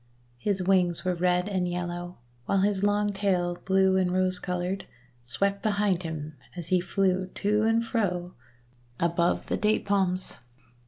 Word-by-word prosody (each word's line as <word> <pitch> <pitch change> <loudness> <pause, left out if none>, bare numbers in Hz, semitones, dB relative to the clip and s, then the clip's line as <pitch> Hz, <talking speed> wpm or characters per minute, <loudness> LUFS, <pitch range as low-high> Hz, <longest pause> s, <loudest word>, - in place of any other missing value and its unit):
His 195 +4 0
wings 180 -2 +2
were 185 - +2
red 180 +1 +1
and 185 -3 0
yellow, 175 0 -4 0.3
while 195 - +2
his 200 -1 +1
long 205 0 +2
tail, 180 -3 0
blue 190 0 +4
and 185 -1 +2
rose 185 0 +1
coloured, 180 +1 -3 0.4
swept 200 +11 -1
behind 205 -4 +1
him 155 -2 -5 0.2
as 170 -2 -6
he 185 -1 +3
flew 185 +1 +1
to 210 +1 +1
and 225 +1 +2
fro 180 -7 -1 0.7
above 170 0 +1
the - - -1
Date 215 +1 +1
palms. 190 -5 0
185 Hz, 150 wpm, -27 LUFS, 175-200 Hz, 0.7 s, blue